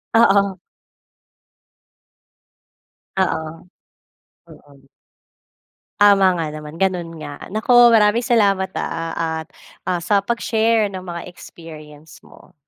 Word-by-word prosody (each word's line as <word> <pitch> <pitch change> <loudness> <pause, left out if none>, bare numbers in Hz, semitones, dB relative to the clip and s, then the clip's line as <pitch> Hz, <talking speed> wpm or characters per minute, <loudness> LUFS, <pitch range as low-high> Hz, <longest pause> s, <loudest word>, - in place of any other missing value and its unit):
Oo. 200 -4 +3 2.6
Oo, 160 -4 -1 1.0
oo. 140 -1 -19 1.1
Tama 195 -3 +5
nga 155 -2 -4
naman, 150 +1 -9
ganun 175 -3 -2
nga. 145 -2 -9
Naku, 240 +3 +5
maraming 225 0 +3
salamat, 200 -6 +1
ah, 165 -1 -3
at, 160 - -14 0.4
ah, 180 - 0
sa 200 +4 +1
pag-share 225 -1 0
ng 185 - -6
mga 175 -2 -7
experience 155 -3 -13
mo. - - -19
185 Hz, 95 wpm, -19 LUFS, 160-210 Hz, 2.6 s, Tama